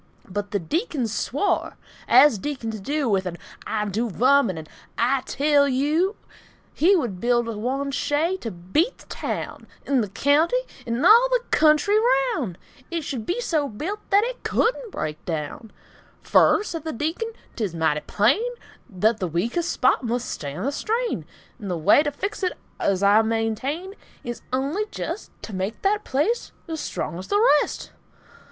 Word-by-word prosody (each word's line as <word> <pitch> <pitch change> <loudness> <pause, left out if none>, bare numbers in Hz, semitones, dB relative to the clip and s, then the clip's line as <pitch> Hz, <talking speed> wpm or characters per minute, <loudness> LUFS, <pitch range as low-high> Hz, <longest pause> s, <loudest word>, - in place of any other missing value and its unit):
But 205 +2 -4
the 200 - 0
Deacon 295 - -1
swore, 260 - -1 0.3
(as 290 -9 +6
Deacons 230 -5 -4
do, 285 +7 -1
With 195 -4 +1
an 175 -1 -5 0.3
"I 215 -1 -1
dew 220 +4 -1
vum," 255 +4 +4
or - - -1
an 160 -2 -7 0.3
"I 255 +3 +2
tell 285 0 +3
yeou,") 300 - +1 0.6
He 370 +6 +4
would 235 - -2
build 240 0 +2
one 265 +6 -2
shay 295 +6 0
to 235 - -5
beat 190 - -1
the - - -17
taown - - -5 0.2
'N' 275 -3 +2
the 210 - -3
keounty 295 - +3 0.3
'n' 235 +6 0
all 470 +6 +8
the - - +2
kentry 315 +7 +4
raoun'; 270 - +1 0.3
It 335 -2 -3
should 255 -6 -5
be 360 - -1
so 310 - 0
built 345 - -4
that 405 +1 +5
it - - -4
couldn' 475 0 0
break 155 - -5
daown: 160 +7 -4 0.5
"Fur," - - +4
said 330 -7 -5
the 320 - -4
Deacon, 325 - -2 0.2
"'t's 205 -8 -2
mighty 160 -2 +1
plain 215 - +2 0.6
Thut 220 +3 +3
the 185 - -1
weakes' 235 - -1
place 260 +1 +5
mus' 240 0 -2
stan' 145 0 -5
the 280 - +1
strain; 460 +10 -2 0.4
'N' 205 - -6
the 180 -2 -1
way 180 - +5
t' 295 - 0
fix 395 +10 -4
it, 365 -1 0 0.3
uz 195 0 +1
I 205 +2 +6
maintain, 225 - -2 0.3
Is 240 -1 -5
only 280 +12 -1
jest 345 +6 -5
T' 220 - -7
make 190 +4 -3
that 415 +2 +2
place 305 - -1
uz 320 -1 -4
strong 170 - -4
uz 185 - -8
the 410 - +2 0.2
rest." - - -5
270 Hz, 170 wpm, -24 LUFS, 210-335 Hz, 0.6 s, all